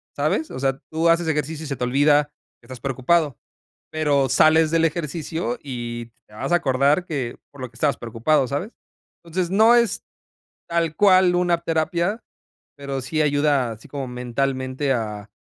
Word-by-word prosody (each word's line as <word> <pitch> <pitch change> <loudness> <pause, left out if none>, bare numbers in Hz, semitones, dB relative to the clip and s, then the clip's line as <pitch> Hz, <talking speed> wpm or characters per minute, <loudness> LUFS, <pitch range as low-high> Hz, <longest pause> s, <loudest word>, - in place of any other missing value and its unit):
¿sabes? 155 +2 0
O 130 - -6
sea, 135 0 0
tú 160 +1 +1
haces 165 0 +2
ejercicio 155 0 -2
y - - -6
se 140 - -3
te 125 - -4
olvida 145 +3 +3 0.3
que 115 - -21
estás 130 0 -9
preocupado. 135 +3 0 0.5
Pero, 145 -4 +1
sales 155 +4 +4
del 165 0 +3
ejercicio 160 -5 -3
y 120 -3 -5 0.2
te 105 - -21
vas 110 - -4
a - - +7
acordar 140 +2 +2
que 135 -8 -4
por 140 - -16
lo 130 - -5
que 115 - -27
estabas 140 +4 0
preocupado, 120 +5 0
¿sabes? 145 - -3 0.5
Entonces, 170 +1 -2
no 220 +4 +6
es 235 -4 +1 0.7
tal 165 -2 -1
cual 185 -2 +5
una 175 -1 +2
terapia, 170 +6 -1 0.5
pero, 140 -1 -4
sí 155 +5 -1
ayuda 145 -4 +2
así 110 0 -13
como 140 -3 -5
mentalmente 130 +2 -2
a 105 -4 -4
145 Hz, 165 wpm, -22 LUFS, 130-165 Hz, 0.7 s, a